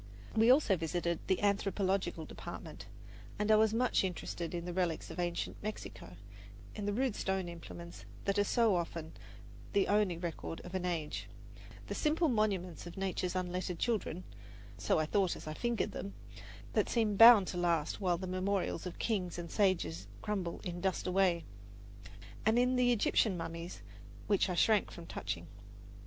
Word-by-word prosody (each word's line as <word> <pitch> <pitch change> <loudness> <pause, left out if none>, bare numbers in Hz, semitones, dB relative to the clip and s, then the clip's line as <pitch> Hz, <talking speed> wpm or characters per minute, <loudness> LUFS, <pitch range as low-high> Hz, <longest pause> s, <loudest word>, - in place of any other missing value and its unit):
We 225 +2 +5
also 255 -6 +5
visited 170 0 -1
the 190 - +2
anthropological 195 -4 0
department, - - -8 0.5
and 210 +1 +1
I - - +8
was 215 0 +4
much 240 0 +2
interested 175 -2 -3
in 170 0 -4
the 175 - -4
relics 175 -3 -1
of - - -7
ancient 175 -1 -2
Mexico, 200 - -7 0.6
in 205 -1 -4
the - - +1
rude 245 +1 0
stone 190 -1 -1
implements 170 0 -9 0.2
that 200 +1 +1
are - - +5
so 225 -1 +3
often 165 -2 -3 0.6
the 200 -1 +3
only 205 -4 +2
record 170 -1 -5
of 180 - -10
an 185 -1 -1
age 165 -4 -3 0.6
the - - -4
simple 315 +1 +2
monuments 195 -7 0
of 175 - -9
nature's 185 -1 -2
unlettered 180 -1 -2
children 200 -5 -1 0.5
(so 105 +3 +1
I 155 - +2
thought 190 +2 +1
as - - -10
I 155 - -4
fingered 235 +5 -1
them) 195 - -6 0.6
that - - +2
seem 220 -3 +1
bound 225 -2 +10
to 180 - -4
last 170 0 0
while 180 -3 +2
the 185 - -5
memorials 185 -1 -1
of 180 - -7
kings 185 -7 -1
and 170 -1 -6
sages 105 - +1 0.2
crumble 190 -5 -2
in 175 -1 -4
dust 190 -1 0
away 180 -2 +2 1.0
and 220 +2 +3
in 250 +1 +3
the 250 -1 +4
Egyptian 215 -3 +2
mummies, 165 +1 -6 0.4
which 200 -2 +2
I 180 - -1
shrank 215 +3 +3
from 170 - -10
touching. 85 - -4
185 Hz, 165 wpm, -33 LUFS, 170-210 Hz, 1.0 s, bound